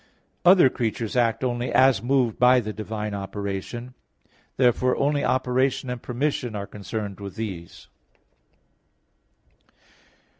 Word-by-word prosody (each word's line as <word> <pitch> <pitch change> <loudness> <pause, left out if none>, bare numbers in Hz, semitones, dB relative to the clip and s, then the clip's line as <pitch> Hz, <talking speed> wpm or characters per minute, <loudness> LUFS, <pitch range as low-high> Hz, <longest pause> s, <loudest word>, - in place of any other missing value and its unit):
Other 180 -4 +7
creatures 115 -1 -3
act 120 0 +1
only 120 -1 -1
as 130 -1 +4
moved 125 -2 +1
by 125 +1 +6
the 110 -2 -5
divine 105 0 -5
operation; 100 +5 -5 0.6
therefore 125 0 +3
only 145 +1 +1
operation 130 0 0
and 125 -1 -5
permission 125 -2 -2
are 100 -1 -4
concerned 105 0 -6
with 100 -1 -8
these. 95 -7 -7
120 Hz, 110 wpm, -24 LUFS, 105-130 Hz, 0.6 s, Other